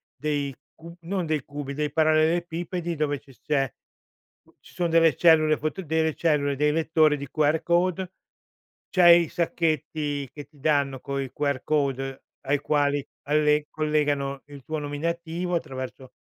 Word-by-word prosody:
dei 145 -3 -2 0.2
cu 170 +1 -12
non 180 +1 -2
dei 155 -4 -1
cubi, 145 -1 -6
dei 150 +1 -2
parallelepipedi 165 +2 +1
dove 145 -2 -1
ci 135 -1 -19
s - - -30
c'è, 135 -4 0 0.9
ci - - -18
sono 175 - 0
delle 165 -3 +4
cellule 155 -1 +5
foto 155 +5 -3
delle 160 0 0
cellule, 145 -4 +1
dei 150 +1 +2
lettori 155 -1 +3
di 140 0 -7
QR 155 +2 +2
code, 180 +2 +1 0.8
c'hai 175 -2 +6
sacchetti 155 -4 -1
che 145 -1 -8
ti 145 +1 -24
danno 140 -2 +1
coi 140 -2 -4
QR 140 -3 -1
code, 135 -3 -1 0.2
ai 140 +1 0
quali 145 -1 +1 0.2
alle 150 +1 +2
collegano 145 -3 -1
il 140 -3 -12
tuo 155 - -4
nominativo 170 +4 -3
attraverso 130 -4 -6
150 Hz, 145 wpm, -25 LUFS, 140-165 Hz, 0.9 s, c'hai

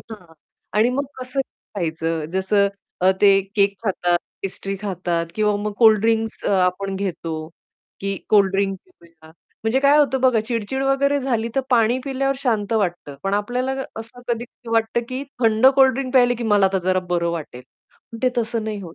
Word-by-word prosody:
हां, 180 -6 -12 0.4
आणि 220 +3 +4
मग 275 +3 -1 0.2
कसंही 255 +2 -2 0.3
खायचं. 165 -2 -2
जसं 200 +2 +2 0.5
ते 200 -1 +6
अ, - - +2 0.2
केक 200 0 +3
खातात, 175 -3 +1 0.2
पेस्ट्री 195 0 -4
खातात 175 -4 -2
किंवा 210 -1 +1
मग 210 +1 -3
कोल्ड 220 -3 +6
ड्रिंक्स 225 0 0
अ, - - +1
आपण 195 +2 -2
घेतो, 185 -4 -4 0.7
की 195 0 -2
कोल्ड 200 -3 +5
ड्रिंक 195 0 0 0.2
पिऊया. 165 -2 -19 0.4
म्हणजे 230 +4 +2
काय 285 +2 +5
होतं 270 -3 +2
बघा 255 -4 +4
चिड-चिड 240 +3 -2
वगैरे 280 +1 +2
झाली, 235 -4 -1
तर - - +4
पाणी 235 0 +3
पिल्यावर 275 0 0
शांत 225 -5 -1
वाटतं. 175 -9 -1
पण 195 +1 0
आपल्याला 250 +6 -1 0.3
असं 230 +2 -12
कधी 235 0 -1 0.3
वाटतं, 225 +1 +1
की 255 +1 -4 0.2
थंड 225 +2 +4
कोल्ड 265 -1 +6
ड्रिंक 260 0 -3
प्यायले 245 -2 +5
की 235 - -5
मला 205 -3 +4
आता 190 0 0
जरा 185 0 +2
बरं 170 -1 +1
वाटेल, 150 -7 -6 0.5
पण 230 - -7
ते 255 - +4
तसं 230 -1 -1
नाही 215 -2 -4
होत. 170 -3 -10
215 Hz, 175 wpm, -21 LUFS, 190-245 Hz, 0.7 s, ते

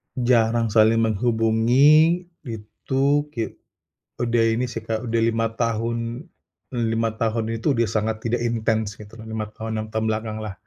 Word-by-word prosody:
Jarang 120 -2 +2
saling 110 +1 +4
menghubungi 120 - +4 0.2
itu 135 +6 -1
ki 115 - -1 0.8
udah 120 -1 +2
ini 125 +2 0
sih, 115 - -5
Kak, 110 +1 -2
udah 115 - +1
5 115 0 0
tahun 115 +2 -2 0.5
5 115 -2 0
tahun 115 0 0
ini 115 - -2
tuh 150 - +3
udah 115 - +2
sangat 110 0 -2
tidak 115 +1 0
intens 110 -2 -1
gitu 105 0 -13
loh, 110 - -9
5 110 -1 -3
tahun, 110 +1 -6
6 110 0 -3
tahun 110 0 -1
belakanglah, 110 -1 -3
115 Hz, 150 wpm, -23 LUFS, 110-120 Hz, 0.8 s, saling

